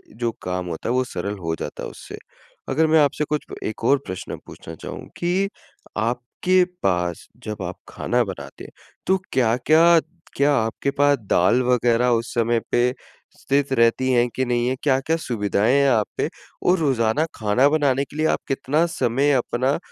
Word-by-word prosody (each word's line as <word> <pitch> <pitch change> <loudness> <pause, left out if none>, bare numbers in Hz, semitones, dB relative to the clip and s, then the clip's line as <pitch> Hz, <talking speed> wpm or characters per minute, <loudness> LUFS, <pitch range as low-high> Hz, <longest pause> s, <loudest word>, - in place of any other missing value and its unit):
जो 120 0 -1
काम 90 0 -3
होता 85 +5 -4
है, - - +1
वो 130 - +2
सरल 100 -3 -4
हो 80 -3 -3
जाता - - -6
है, - - -4
उससे। - - -10 0.5
अगर 160 +4 +2
मैं 160 0 +5
आपसे 145 0 +2
कुछ 150 0 -1
अ, - - -7
एक 110 - -6
और 140 +5 +4
प्रश्न 95 0 -6
पूछना 80 - -10
चाहूँ - - -8
कि 185 +3 0 0.5
आपके 125 +11 +1 0.2
पास 90 -2 -1 0.2
जब 105 -3 -5
आप 90 0 -5
खाना 120 0 0
बनाते 70 -9 -8
हैं, - - -11 0.4
तो 190 - +4
क्या-क्या, 155 +8 +4 0.4
क्या 145 +1 +3
आपके 115 +4 -1
पास 145 0 +3
दाल 95 +8 +4
वगैरह 125 -1 +2
उस 115 - -9
समय 115 0 +2
पे 125 +1 +2 0.4
स्थित 140 0 0
रहतीं 115 +2 +3
है 120 0 +3
कि 130 - 0
नहीं 120 -1 0
है? 130 - 0
क्या-क्या 135 +3 +2
सुविधाएँ 110 -5 0
हैं 140 0 +4
आप 110 -5 +2
पे? - - 0 0.3
और 180 - +4
रोज़ाना 135 -1 +1
खाना 110 +5 +3
बनाने 140 -3 +2
के 145 - -16
लिए 155 - +1
आप - - +1
कितना 145 +4 +1
समय 140 -4 +1
अपना 130 +1 +1
125 Hz, 180 wpm, -22 LUFS, 110-145 Hz, 0.5 s, मैं